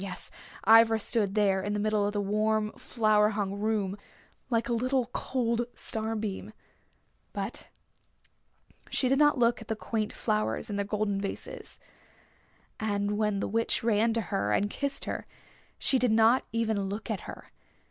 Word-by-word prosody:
Yes, 195 -1 -4 0.3
Ivra 225 +1 +7
stood 210 -2 +1
there 195 -3 +3
in 205 +2 -2
the 210 - -1
middle 210 -1 +1
of 205 - -3
the 205 - 0
warm, 215 +1 +1
flower 215 -3 +2
hung 200 -2 -2
room, 210 -3 0 0.5
like 230 -2 +1
a 240 - 0
little 250 +1 0
cold 235 -2 -1
star 220 0 -2
beam. 210 -1 -4 0.8
But 200 +2 -4 1.2
she 260 - +1
did 270 +2 +2
not 295 -1 +5
look 235 -1 +2
at 220 - -10
the 220 - -1
quaint 215 0 -2
flowers 110 - -1
in - - -2
their 200 0 -1
golden 205 -1 -1
vases. 200 - -7 1.0
And 205 -1 -1
when 210 -2 0
the - - -1
Witch 230 +2 0
ran 225 0 +3
to 230 - 0
her 100 +1 +1
and 205 - +1
kissed 280 -1 -1
her - - -4 0.5
she 265 - +3
did 245 -2 +2
not 225 +3 +4
even 220 -4 0
look 215 +3 -4
at 205 - -2
her. - - -10
215 Hz, 165 wpm, -29 LUFS, 205-230 Hz, 1.2 s, Ivra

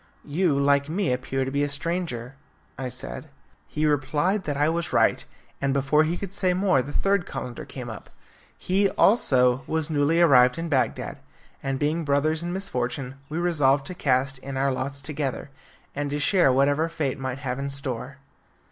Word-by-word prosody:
"You, 150 -1 +1
like 140 +1 +3
me, 175 -4 0
appear 130 +1 -2
to 135 - -4
be 140 +1 0
a 145 - +1
stranger," 145 -5 -3 0.4
I 135 - -4
said. 65 - -6 0.4
He 155 - -1
replied 150 +7 +1
that 145 -2 -2
I 145 +1 +3
was 165 +1 -1
right, - - +3 0.4
and 140 -1 +1
before 140 +3 +3
he 170 +3 -1
could 195 0 -6
say 185 -3 +1
more 185 -8 +3
the 140 - -7
third 195 +2 +1
calender 125 -2 -6
came 125 -2 -8
up. 110 -3 -9 0.5
He, 195 +2 +1
also, 130 - +3
was 160 0 -1
newly 150 +3 +2
arrived 130 -6 +6
in 165 0 -3
Bagdad, 135 -4 -1 0.4
and 135 -1 -2
being 150 +4 0
brothers 155 +2 +1
in 175 +1 -3
misfortune, 130 -8 -2 0.2
we 155 - -4
resolved 145 -6 +2
to 185 - -5
cast 135 -4 0
in 135 0 -6
our 135 +1 +2
lots 135 +2 -4
together, 140 -1 -4 0.4
and 145 0 -3
to 145 - -2
share 160 0 +4
whatever 145 +5 +2
fate 150 -6 -2
might 130 -1 -3
have 130 -2 -4
in 140 0 -3
store. 135 -1 -4
145 Hz, 180 wpm, -25 LUFS, 135-165 Hz, 0.5 s, arrived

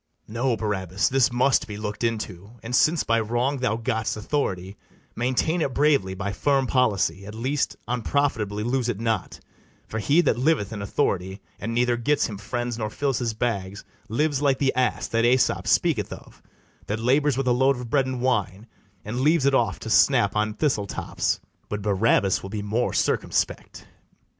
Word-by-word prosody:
No, 115 +2 -1
Barabas, 95 -3 -1
this 135 -1 +3
must 125 +2 +2
be 105 -2 -6
look'd 105 +1 -5
into; 105 -3 -3
And, 120 +2 -2
since 155 +4 +3
by 115 0 +2
wrong 120 +5 0
thou 115 -3 0
gott'st 110 -2 -2
authority, 100 -6 -2 0.4
Maintain 130 +8 0
it 135 -4 -1
bravely 140 -11 +2
by 100 +1 -3
firm 135 +4 +1
policy; 100 -8 +1
At 105 - -8
least, 135 +5 -1
unprofitably 120 -4 -1
lose 120 +1 0
it 105 -4 -2
not; 110 -4 -2 0.5
For 110 - -4
he 145 +10 +3
that 140 -7 +1
liveth 130 -7 +1
in 105 - -5
authority, 95 -3 -1 0.2
And 115 +3 -4
neither 120 0 +2
gets 145 +5 +1
him 105 -3 -6
friends 120 +2 -3
nor 110 -1 -2
fills 135 +2 -1
his 115 -3 -2
bags, 100 -4 -3 0.2
Lives 145 +4 0
like 140 -2 +2
the 135 -2 +1
ass 125 -2 0
that 115 0 +1
Aesop 120 -6 +2
speaketh 120 - +2
of, - - -11 0.5
That 105 - -1
labours 135 +3 +2
with 135 - 0
a - - +4
load 135 +3 +3
of 125 -2 -8
bread 135 -2 +2
and 130 -2 -3
wine, 105 -5 0 0.4
And 120 +5 -3
leaves 155 0 +3
it 140 - +3
off 120 -4 +2
to 110 - -6
snap 120 -5 +4
on 105 0 0
thistle 125 -10 0
tops: - - -2 0.3
But 105 -1 -4
Barabas 100 -1 +2
will 95 - -7
be 105 0 -4
more 110 +4 0
circumspect. - - -1
115 Hz, 180 wpm, -24 LUFS, 105-130 Hz, 0.5 s, a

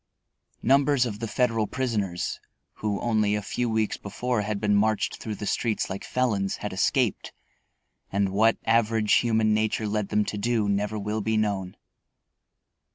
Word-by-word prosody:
Numbers 135 +1 +4
of 105 -3 -5
the 115 - -3
Federal 115 -1 +1
prisoners, 105 -9 -2 0.4
who 105 -2 -2
only 110 -3 +2
a 105 - -1
few 120 +4 -2
weeks 110 -1 0
before 120 +3 -2
had 105 0 -2
been 105 0 +1
marched 110 +1 +1
through 110 -2 -5
the 105 - -6
streets 110 -2 -1
like 95 - -5
felons, 105 -7 0
had - - -5
escaped, - - 0 0.8
and 100 0 +1
what 110 +4 +3
average 115 -1 +2
human 110 -2 +3
nature 110 0 0
led 105 -1 -1
them 105 0 +2
to 105 - -4
do 115 -1 +1
never 100 +1 0
will 105 +1 -2
be 110 +1 0
known. 100 -4 -1
110 Hz, 160 wpm, -26 LUFS, 105-115 Hz, 0.8 s, Numbers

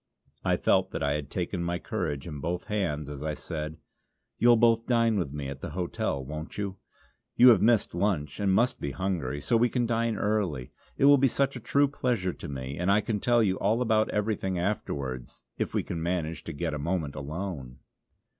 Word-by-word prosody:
I - - +2
felt - - +2
that - - -2
I 70 0 +2
had 75 -1 -4
taken 90 0 -2
my 85 0 -1
courage 80 -10 -3
in 75 -4 -6
both 85 +5 -2
hands 80 -9 -2
as 70 -1 -7
I 75 0 -2
said: 80 -1 -5 0.6
"You'll 120 +1 +6
both 115 0 +3
dine 115 -2 +3
with 90 -9 -1
me 70 -1 -4
at 70 0 -7
the - - -4
hotel, 75 -6 -2
won't 75 +3 -7
you. 100 -2 -3 0.6
You 125 +1 +8
have 115 - +6
missed 115 -1 +3
lunch 85 -6 -1
and 100 -2 +2
must 120 +6 +2
be 70 - -3
hungry, 80 -6 -2
so 80 - +1
we 120 +2 +3
can 120 -1 0
dine 115 -1 0
early. 100 -12 -1 0.3
It - - +3
will 145 -1 +7
be 135 - +5
such 135 +2 0
a - - -5
true 140 +5 +3
pleasure 120 -9 -1
to - - -8
me; 70 +1 -5
and 90 +2 0
I 105 +2 +4
can 105 -1 -2
tell 120 +2 +3
you 95 -3 +1
all 110 +4 +2
about 110 -3 +2
everything 105 -3 -1
afterwards, 70 - -3 0.2
if - - -1
we - - +1
can 85 - -4
manage 85 -1 -2
to - - -4
get 80 +1 -3
a 75 - -3
moment 80 -2 -1
alone." 75 -3 -5
90 Hz, 210 wpm, -28 LUFS, 75-110 Hz, 0.6 s, You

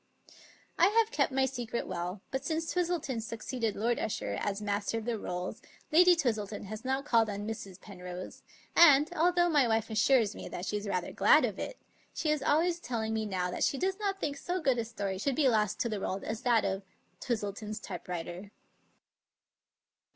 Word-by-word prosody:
I 350 - +7
have 450 +2 +3
kept 280 -2 +1
my 265 0 +2
secret 240 -3 -3
well, 180 +3 -4
but 265 0 -2
since 320 +3 -2
Twistleton 335 -9 -1
suc 225 0 -7
ceeded 230 -5 -2
Lord 235 +3 0
Usher 220 - -2
as 200 0 -1
Master 205 +1 -1
of 225 - -5
the 235 -2 -1
Rolls 180 +6 -4 0.3
Lady 355 +3 +7
Twistleton 220 - -1
has 215 +2 -7
not 265 +2 -1
called 230 -5 +3
on 205 0 -4
Mrs. 200 -4 -6
Penrose, 180 -2 -8 0.3
and, 305 0 +7
although 350 +1 +3
my 295 -7 +4
wife 225 0 0
assures 220 0 +3
me - - -7
that 180 - -5
she 210 - -2
is 205 0 -3
rather 180 -3 -2
glad - - +5
of - - -4
it, - - -5 0.4
she 310 - 0
is 305 -2 0
always 335 +5 +2
tell 240 -8 -3
ing 220 0 -2
me 220 -1 -1
now 180 -2 -1
that - - -2
she 275 - +2
does 380 +5 -1
not 395 -2 -1
think 285 -4 -2
so 355 +6 -2
good 265 -7 +2
a 230 - -1
story 200 -4 -4
should 275 +5 0
be 290 -1 +3
lost 215 -4 +2
to - - +1
the 215 -3 -3
world 195 0 -3
as 220 +2 -4
that 240 -3 +3
of 195 0 -1 0.2
" - - -40
Twistleton's 215 -2 -3
typewriter." 180 0 -6
230 Hz, 200 wpm, -31 LUFS, 205-290 Hz, 0.4 s, I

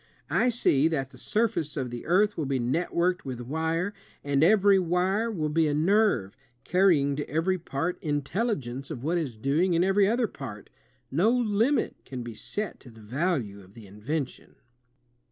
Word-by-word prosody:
I 250 - +3
see... 160 - +3
that 140 -5 -2
the 130 - -14
surface 210 - -1
of 130 -3 -3
the 120 -1 -7
earth 205 +5 +3
will 155 -4 -2
be 135 -1 0
networked 170 +7 0
with 130 -3 -5
wire, 160 - -2 0.3
and 145 0 +2
every 200 +1 +5
wire 185 +5 +1
will 165 -9 -2
be 160 +1 +2
a 145 - 0
nerve, 165 - +2 0.3
carrying 170 -7 +3
to 145 - -4
every 175 +5 0
part 165 +2 -3
intelligence 145 - -2
of 135 -6 -6
what 170 +4 +1
is 135 -9 -4
doing 155 +10 +1
in 170 - +3
every 195 +1 +3
other 235 +3 +2
part.... 120 - -9 0.4
No 170 +11 +3
limit 240 +2 +1
can 125 -2 -6
be 120 -1 -7
set 205 - -5
to 125 - -14
the 115 -1 -15
value 120 - -2
of 95 +1 -18
the 115 -3 -12
invention!" 125 +9 -5
160 Hz, 170 wpm, -27 LUFS, 135-190 Hz, 0.4 s, every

